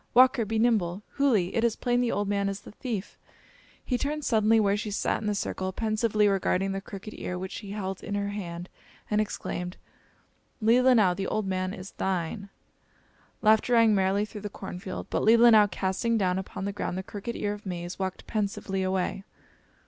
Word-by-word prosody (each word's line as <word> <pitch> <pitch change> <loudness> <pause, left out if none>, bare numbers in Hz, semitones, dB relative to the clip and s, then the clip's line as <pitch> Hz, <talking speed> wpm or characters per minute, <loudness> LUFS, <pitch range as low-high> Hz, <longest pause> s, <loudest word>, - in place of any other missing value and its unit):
Walker, 255 -2 +6
be 220 +2 -2
nimble! 210 -5 +1 0.2
Hooli! 220 -11 +2
It 230 - +2
is 235 -2 +2
plain 245 0 +1
the 245 - +1
old 205 0 -1
man 200 0 0
is 195 +1 -5
the - - -12
thief." 220 -3 -5 0.7
He 250 -2 0
turned 300 +1 -2
suddenly 220 -1 +4
where 200 -2 +3
she 210 +1 -3
sat 205 - -1
in 215 - -3
the 210 - +1
circle, 190 -1 -2
pensively 215 0 +1
regarding 195 -1 +1
the 195 0 -3
crooked 200 +2 -9
ear 180 - -4
which 185 +1 -5
she 205 - -7
held 195 -2 -4
in 205 - -3
her 200 0 -1
hand, 175 -4 -5 0.4
and 210 0 +3
exclaimed: 180 -3 -4 0.8
"Leelinau, 230 -4 +5
the 195 0 -3
old 215 - -1
man 185 -1 -1
is 190 0 -8
thine!" 190 +2 -2 0.9
Laughter 220 +3 +4
rang 230 -2 +6
merrily 195 +1 +2
through 210 -1 -9
the 205 - -4
corn 180 - -7
field, 190 -1 -6
but - - +1
Leelinau, 225 -1 +7
casting 195 +5 0
down 185 -2 +1
upon 190 0 -6
the 200 - -2
ground 185 -2 -3
the 190 - -3
crooked 205 +4 -6
ear 205 0 -1
of 210 -1 -9
maize, 175 0 -5
walked 190 -1 -3
pensively 200 -2 -2
away. 190 +1 -1
205 Hz, 190 wpm, -27 LUFS, 190-220 Hz, 0.9 s, Leelinau